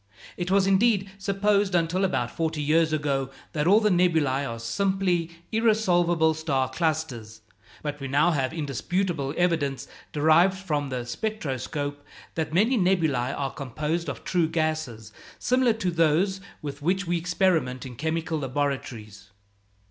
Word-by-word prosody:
It 175 Hz, 0 st, -3 dB
was, 195 Hz, 0 st, +4 dB
indeed, 195 Hz, 0 st, +3 dB
supposed, 200 Hz, 0 st, +1 dB
until 170 Hz, +3 st, +1 dB
about 120 Hz, -10 st, 0 dB
forty 160 Hz, -2 st, -2 dB
years 155 Hz, +2 st, +2 dB
ago, 140 Hz, -3 st, 0 dB, 0.2 s
that 150 Hz, 0 st, 0 dB
all 205 Hz, +4 st, +6 dB
the 215 Hz, -2 st, +2 dB
nebulæ 160 Hz, -7 st, +2 dB
are 115 Hz, -, -5 dB
simply 180 Hz, +7 st, 0 dB, 0.2 s
irresolvable 175 Hz, -8 st, +3 dB
star 145 Hz, -5 st, 0 dB
clusters; 130 Hz, -9 st, -2 dB, 0.4 s
but 145 Hz, -1 st, -4 dB
we 135 Hz, -, -5 dB
now 145 Hz, +6 st, +3 dB
have 135 Hz, -5 st, 0 dB
indisputable 160 Hz, 0 st, -2 dB
evidence, 160 Hz, -6 st, 0 dB, 0.2 s
derived 160 Hz, +6 st, +4 dB
from 150 Hz, -7 st, -2 dB
the 125 Hz, -2 st, -3 dB
spectroscope, 145 Hz, -, -4 dB, 0.3 s
that 155 Hz, -2 st, -2 dB
many 220 Hz, +9 st, +3 dB
nebulæ 160 Hz, -9 st, +1 dB
are 135 Hz, -1 st, -2 dB
composed 150 Hz, +5 st, -3 dB
of -, -, -6 dB
true 175 Hz, -3 st, +1 dB
gases, 155 Hz, -10 st, -2 dB, 0.2 s
similar 255 Hz, -2 st, +2 dB
to 190 Hz, -5 st, -2 dB
those 170 Hz, +4 st, +2 dB, 0.2 s
with 145 Hz, -1 st, -6 dB
which 185 Hz, +5 st, 0 dB
we 175 Hz, 0 st, 0 dB
experiment 165 Hz, -8 st, 0 dB
in 125 Hz, -2 st, -8 dB
chemical 160 Hz, +3 st, -2 dB
laboratories. 130 Hz, -7 st, -4 dB
160 Hz, 140 wpm, -26 LUFS, 140-185 Hz, 0.4 s, all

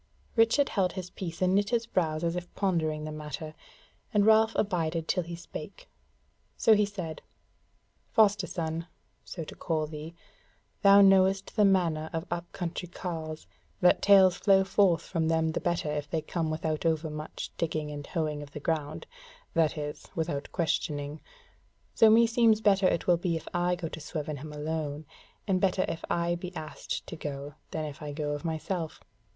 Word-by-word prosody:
Richard 230 Hz, +5 st, +4 dB
held 185 Hz, -3 st, +1 dB
his 185 Hz, -2 st, -6 dB
peace 170 Hz, -1 st, -4 dB
and 185 Hz, 0 st, +3 dB
knit 200 Hz, +1 st, +2 dB
his 235 Hz, -1 st, +1 dB
brows 160 Hz, -7 st, -1 dB
as 170 Hz, 0 st, 0 dB
if 180 Hz, 0 st, -5 dB
pondering 160 Hz, -6 st, 0 dB
the 155 Hz, -, -5 dB
matter, 155 Hz, 0 st, -6 dB, 0.6 s
and 205 Hz, -3 st, +3 dB
Ralph 220 Hz, +1 st, +5 dB
abided 165 Hz, -5 st, 0 dB
till 180 Hz, -, +1 dB
he 170 Hz, 0 st, -6 dB
spake: -, -, -9 dB, 0.7 s
so 225 Hz, -, +5 dB
he 210 Hz, -1 st, +3 dB
said: 180 Hz, -6 st, -6 dB, 0.9 s
"Foster 210 Hz, -4 st, +4 dB
son, 165 Hz, 0 st, -3 dB, 0.4 s
so 170 Hz, -, -6 dB
to -, -, -9 dB
call 155 Hz, -2 st, -1 dB
thee, 155 Hz, +2 st, -8 dB, 0.7 s
thou 200 Hz, 0 st, +8 dB
knowest 195 Hz, 0 st, +4 dB
the 210 Hz, -2 st, +5 dB
manner 170 Hz, -5 st, +2 dB
of 165 Hz, +1 st, -2 dB
up 175 Hz, 0 st, -4 dB
country 175 Hz, 0 st, -4 dB
carles, 160 Hz, -3 st, -5 dB, 0.3 s
that 180 Hz, 0 st, +4 dB
tales 190 Hz, -3 st, +6 dB
flow 195 Hz, -2 st, +4 dB
forth 190 Hz, -4 st, +3 dB
from 165 Hz, -3 st, -1 dB
them 160 Hz, 0 st, +2 dB
the -, -, -3 dB
better 170 Hz, -3 st, -1 dB
if 145 Hz, -1 st, -3 dB
they 160 Hz, -1 st, -1 dB
come 165 Hz, 0 st, -2 dB
without 155 Hz, -1 st, -2 dB
over 160 Hz, -1 st, 0 dB
much 150 Hz, 0 st, -6 dB
digging 155 Hz, -2 st, -1 dB
and 145 Hz, -1 st, -7 dB
hoeing 155 Hz, -4 st, -2 dB
of 145 Hz, 0 st, -11 dB
the 150 Hz, -, -5 dB
ground; 150 Hz, -1 st, -2 dB, 0.5 s
that 160 Hz, -1 st, +2 dB
is, 150 Hz, 0 st, -5 dB
without 160 Hz, -4 st, -2 dB
questioning; 150 Hz, -3 st, -2 dB, 0.7 s
so 225 Hz, -, +6 dB
meseems 230 Hz, 0 st, +5 dB
better 195 Hz, -3 st, +4 dB
it 170 Hz, -, 0 dB
will 175 Hz, -1 st, +4 dB
be 170 Hz, -1 st, -1 dB
if 160 Hz, -, -6 dB
I 175 Hz, 0 st, +1 dB
go 175 Hz, -2 st, -4 dB
to 160 Hz, -, -7 dB
Swevenham 150 Hz, -1 st, -5 dB
alone, 150 Hz, 0 st, -3 dB, 0.4 s
and 185 Hz, -2 st, +1 dB
better 185 Hz, -1 st, +2 dB
if 165 Hz, -, -4 dB
I 170 Hz, 0 st, +1 dB
be 180 Hz, +1 st, -6 dB
asked 155 Hz, -3 st, -5 dB
to -, -, -7 dB
go, 145 Hz, -1 st, -6 dB, 0.2 s
than 155 Hz, -1 st, -3 dB
if 150 Hz, 0 st, -8 dB
I 150 Hz, -1 st, -5 dB
go 150 Hz, 0 st, -2 dB
of 145 Hz, 0 st, -4 dB
myself. 165 Hz, +1 st, -3 dB
165 Hz, 175 wpm, -29 LUFS, 155-190 Hz, 0.9 s, thou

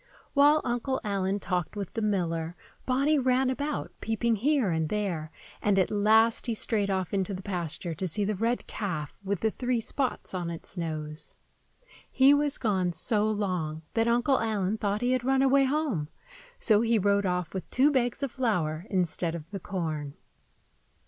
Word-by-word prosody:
While 295 Hz, +2 st, +5 dB
Uncle 250 Hz, +2 st, -1 dB
Allen 200 Hz, -1 st, -1 dB
talked 180 Hz, 0 st, -2 dB
with 200 Hz, -3 st, -5 dB
the 225 Hz, -, -2 dB
miller, 170 Hz, -5 st, -1 dB, 0.3 s
Bonny 280 Hz, +4 st, +3 dB
ran 260 Hz, 0 st, +2 dB
about, 285 Hz, +3 st, -3 dB
peeping 225 Hz, +1 st, 0 dB
here 260 Hz, -, +2 dB
and 160 Hz, -1 st, 0 dB
there; 180 Hz, -7 st, -2 dB, 0.3 s
and 205 Hz, -1 st, +2 dB
at 190 Hz, -, +2 dB
last 220 Hz, +3 st, +3 dB
he 230 Hz, -, 0 dB
strayed 210 Hz, -2 st, +1 dB
off 190 Hz, -2 st, -1 dB
into 195 Hz, 0 st, -1 dB
the 185 Hz, -, -8 dB
pasture 175 Hz, -3 st, -3 dB
to 185 Hz, +4 st, -3 dB
see 200 Hz, +5 st, 0 dB
the 215 Hz, -, 0 dB
red 230 Hz, +5 st, -1 dB
calf 165 Hz, -8 st, -4 dB
with 195 Hz, -2 st, -2 dB
the 220 Hz, -, +2 dB
three 245 Hz, 0 st, -1 dB
spots 255 Hz, +1 st, -2 dB
on 175 Hz, -2 st, -2 dB
its 170 Hz, +3 st, -7 dB
nose. 155 Hz, -3 st, -5 dB, 0.7 s
He 270 Hz, +2 st, +6 dB
was 290 Hz, -1 st, +2 dB
gone 190 Hz, -6 st, 0 dB
so 210 Hz, +5 st, +1 dB
long 180 Hz, -7 st, -2 dB
that 225 Hz, 0 st, +2 dB
Uncle 245 Hz, +3 st, +3 dB
Allen 215 Hz, -2 st, -1 dB
thought 205 Hz, +1 st, -1 dB
he 245 Hz, +1 st, +1 dB
had 255 Hz, -1 st, +1 dB
run 265 Hz, +1 st, +3 dB
away 275 Hz, 0 st, +4 dB
home, 265 Hz, -, -1 dB, 0.5 s
so 215 Hz, -1 st, +4 dB
he 230 Hz, 0 st, +3 dB
rode 200 Hz, 0 st, +2 dB
off 180 Hz, -2 st, -2 dB
with 190 Hz, -, -5 dB
two 275 Hz, +4 st, +4 dB
bags 250 Hz, 0 st, 0 dB
of 275 Hz, -, -1 dB
flour 180 Hz, -, -1 dB
instead 175 Hz, -2 st, 0 dB
of 165 Hz, +2 st, -9 dB
the 200 Hz, -, -4 dB
corn. 155 Hz, -6 st, -4 dB
205 Hz, 175 wpm, -28 LUFS, 180-245 Hz, 0.7 s, He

